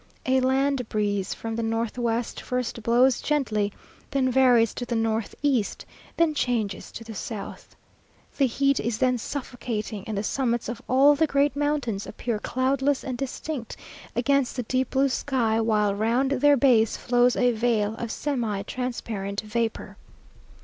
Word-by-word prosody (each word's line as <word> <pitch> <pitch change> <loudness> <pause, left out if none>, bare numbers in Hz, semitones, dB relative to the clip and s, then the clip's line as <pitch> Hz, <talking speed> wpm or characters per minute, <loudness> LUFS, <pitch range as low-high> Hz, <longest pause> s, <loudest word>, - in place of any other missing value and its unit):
A 260 0 +3
land 265 -1 +1
breeze 205 -2 -1
from 225 0 -5
the 230 - -2
north 225 0 -1
west 235 -1 -2
first 250 -2 -3
blows 240 +3 +3
gently, 220 -9 0 0.4
then 260 -2 +1
varies 245 -3 +4
to - - -5
the 240 -1 -3
north 225 -1 -1
east, 260 -8 0 0.3
then 330 -2 +3
changes 230 -8 -1
to 230 - -7
the 225 0 -8
south. 210 0 -7 0.6
The 275 - +3
heat 275 +2 +1
is 225 -1 -1
then 250 0 +2
suffocating 225 -6 -4
and 215 -2 -3
the 200 - -1
summits 240 0 -1
of 235 +1 -5
all 275 +3 +6
the 315 +2 +2
great 280 -1 +2
mountains 285 -8 -1
appear 235 -3 -3
cloudless 265 +4 0
and 255 - -3
distinct 270 -1 -5 0.4
against 275 +2 +1
the 250 - -2
deep 255 +2 0
blue 270 +1 +2
sky, 235 -5 0
while 210 -2 +2
round 235 +6 +1
their 285 +1 +4
base 235 -5 +4
flows 245 0 +3
a 245 -1 +3
veil 220 -2 +1
of 235 - -4
semi 230 -9 -2
transparent 220 -5 -4
vapour. 225 +1 -3
240 Hz, 155 wpm, -25 LUFS, 225-265 Hz, 0.6 s, all